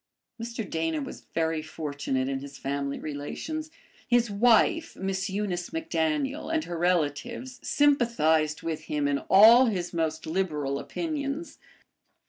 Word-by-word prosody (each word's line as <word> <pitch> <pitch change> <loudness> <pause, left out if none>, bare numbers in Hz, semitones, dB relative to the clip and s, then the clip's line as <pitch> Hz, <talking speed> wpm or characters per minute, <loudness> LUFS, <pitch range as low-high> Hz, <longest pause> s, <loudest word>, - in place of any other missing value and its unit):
Mr. 230 -2 -4
Dana 160 -1 -1
was 140 - -8
very 160 -1 +1
fortunate 145 -4 -3
in 135 0 -2
his 140 0 -9
family 140 0 -3
relations. 230 - -5 0.4
His 240 -2 +3
wife, 235 +9 +3
Miss 195 +1 -2
Eunice 190 -3 -2
MacDaniel, 270 - -1
and 320 -1 +1
her 170 -1 -5
relatives 180 - -1
sympathized 165 - +2
with 160 -1 -4
him 145 -1 0
in 140 -1 +1
all 230 +6 +8
his 185 -6 -2
most 160 -1 -1
liberal 155 -5 -1
opinions. 305 - -4
175 Hz, 125 wpm, -27 LUFS, 155-240 Hz, 0.4 s, all